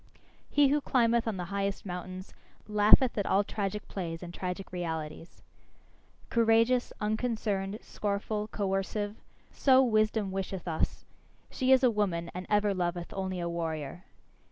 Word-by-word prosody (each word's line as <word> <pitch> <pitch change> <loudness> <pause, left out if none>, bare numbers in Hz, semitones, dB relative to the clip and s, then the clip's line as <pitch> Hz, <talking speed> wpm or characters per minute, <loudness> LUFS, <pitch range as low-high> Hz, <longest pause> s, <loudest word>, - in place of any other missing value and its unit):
He 290 -2 +4
who 295 +1 +2
climbeth 235 -3 +2
on 215 -4 -1
the 180 - -3
highest 200 0 -2
mountains, 185 +1 -6 0.3
laugheth 210 +4 +5
at 200 - -1
all 200 +2 +3
tragic 205 0 -3
plays 170 -3 -5
and 175 0 -8
tragic 180 +1 -5
realities. 165 -2 -5 0.9
Courageous, 230 +2 +3
unconcerned, 210 -2 -1
scornful, 210 +1 -2
coercive 205 +1 -2 0.3
so 265 -1 +5
wisdom 215 -3 +2
wisheth 190 -1 -4
us; 160 -2 -2 0.5
she 260 0 +1
is 265 0 +6
a 250 - +6
woman, 180 -6 -1
and 180 +1 -6
ever 210 -1 +3
loveth 175 -1 -2
only 190 -1 -3
a 170 - -2
warrior. 165 -1 -4
200 Hz, 135 wpm, -30 LUFS, 180-220 Hz, 0.9 s, is